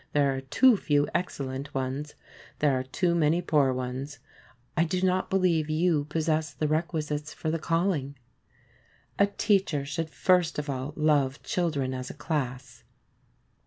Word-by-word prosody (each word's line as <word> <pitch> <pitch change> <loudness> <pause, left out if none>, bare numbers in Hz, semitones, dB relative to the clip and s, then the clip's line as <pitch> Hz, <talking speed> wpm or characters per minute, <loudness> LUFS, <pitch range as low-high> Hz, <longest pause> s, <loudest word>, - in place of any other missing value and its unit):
There 140 -2 +3
are 135 - -4
too 230 - +4
few 145 -5 +1
excellent 140 -5 -3
ones. 135 +3 -3 0.4
There 145 -2 +2
are 130 - 0
too 170 +7 0
many 165 0 +3
poor 150 -6 +2
ones. 130 +3 -4 0.6
I 165 - +3
do 170 +2 -1
not 185 0 +1
believe 175 -5 +2
you 155 -1 +2
possess 155 0 0
the 155 - 0
requisites 155 -1 -2
for 160 - -2
the 165 - -1
calling. 165 -5 0 1.0
A 200 - +6
teacher 195 -8 +1
should 155 +3 -3
first 180 +1 +2
of 150 -1 -2
all 135 +2 -4
love 145 -3 +1
children 145 -7 -1
as 130 0 -5
a - - -8
class. 135 -5 -4
150 Hz, 150 wpm, -27 LUFS, 140-170 Hz, 1.0 s, A